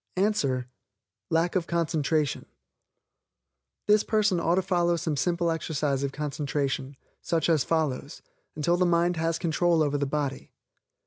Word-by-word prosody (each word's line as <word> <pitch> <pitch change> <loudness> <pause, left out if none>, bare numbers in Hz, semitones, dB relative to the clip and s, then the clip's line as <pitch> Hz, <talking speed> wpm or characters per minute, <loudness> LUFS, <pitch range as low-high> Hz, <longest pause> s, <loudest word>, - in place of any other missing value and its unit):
Answer 145 - 0 0.6
Lack 165 +2 +1
of 180 -3 0
concentration. 160 -3 0 1.4
This 210 0 +4
person 210 -4 +2
ought 170 +1 +2
to 190 - +1
follow 175 -2 +2
some 165 -2 -2
simple 170 +3 0
exercise 150 -4 -1
of 140 -1 -1
concentration, 140 -2 -3 0.2
such 165 -1 0
as 160 -5 +3
given 160 -2 +1
below, - - -13 0.5
until 170 +3 +1
the 180 0 +3
mind 170 0 +2
has 165 0 0
control 170 -1 +2
over 145 -1 0
the 140 - 0
body. 140 -2 -3
165 Hz, 140 wpm, -27 LUFS, 145-175 Hz, 1.4 s, This